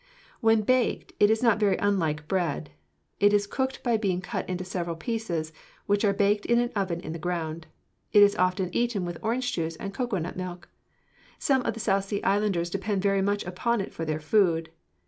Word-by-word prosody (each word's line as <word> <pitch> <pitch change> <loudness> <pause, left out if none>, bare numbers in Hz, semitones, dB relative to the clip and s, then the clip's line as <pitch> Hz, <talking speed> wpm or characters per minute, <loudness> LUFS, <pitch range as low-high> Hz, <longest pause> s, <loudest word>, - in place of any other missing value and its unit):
When 225 -1 +3
baked, 255 +2 +1
it 205 - +6
is 220 +2 +2
not 230 -3 +4
very 200 -3 +3
unlike 160 -7 0
bread. 165 -6 -1 0.5
It 205 0 +5
is 205 0 +3
cooked 265 +5 -3
by 235 -3 +2
being 195 -4 0
cut 185 - -4
into 185 0 -3
several 175 -3 -3
pieces, 165 -4 -3 0.3
which 205 +1 +1
are 205 - +4
baked 205 +1 +1
in 235 - +4
an 240 0 +1
oven 185 -4 -1
in 155 - -6
the 165 - -6
ground. 165 -2 -3 0.4
It 205 - +8
is 200 0 +4
often 185 0 0
eaten 235 -6 0
with 175 -1 -5
orange 245 +3 -1
juice 165 -1 -2
and 195 +4 -6
cocoanut 195 -8 -2
milk. 180 -1 -6 0.7
Some 270 -2 +2
of - - 0
the - - -7
South 195 -2 +1
Sea 200 0 -3
islanders 195 -4 +1
depend 195 0 -1
very 195 -1 +2
much 205 +1 0
upon 205 +6 0
it 195 - -4
for 165 - -5
their 155 -1 -2
food. 165 -1 +2
195 Hz, 200 wpm, -27 LUFS, 175-215 Hz, 0.7 s, It